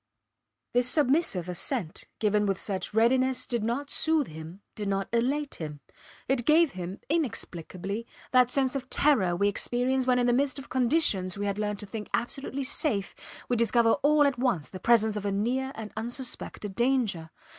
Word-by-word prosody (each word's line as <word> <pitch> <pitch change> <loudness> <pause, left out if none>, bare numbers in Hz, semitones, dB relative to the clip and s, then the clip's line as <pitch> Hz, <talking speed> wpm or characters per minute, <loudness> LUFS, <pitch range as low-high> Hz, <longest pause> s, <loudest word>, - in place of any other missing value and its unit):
This 245 +1 +4
submissive 275 - +2
assent 180 - -1
given 210 -1 +1
with 195 -1 -1
such 195 -3 -3
readiness 255 +3 +3
did 235 -3 -2
not 255 +6 -2
soothe 315 -3 +3
him, 160 +5 -10
did 210 -1 -5
not 195 0 -1
elate 275 +5 0
him; 150 -2 -6 0.5
it 260 -2 +1
gave 310 +2 +4
him, 185 +1 -6
inexplicably, 220 - -3 0.2
that 250 -1 +5
sense 265 0 0
of 260 -1 -4
terror 215 -13 +3
we 200 +3 +2
experience 250 +5 0
when 250 -1 +4
in 245 - +2
the 245 - +3
midst 275 +2 +1
of 275 - -9
conditions 240 - +2
we 205 - -2
had 200 0 -2
learned 210 -1 -1
to - - -6
think 210 +1 -7
absolutely 270 +3 -3
safe 250 -7 0 0.3
we 245 - +1
discover 235 0 +3
all 295 +1 +4
at 275 -4 0
once 240 - 0
the 185 - -8
presence 220 0 +3
of 210 - -3
a - - 0
near 250 +7 -1
and 220 -1 -8
unsuspected 235 -3 -4
danger. 230 -8 0
235 Hz, 175 wpm, -28 LUFS, 200-265 Hz, 0.5 s, that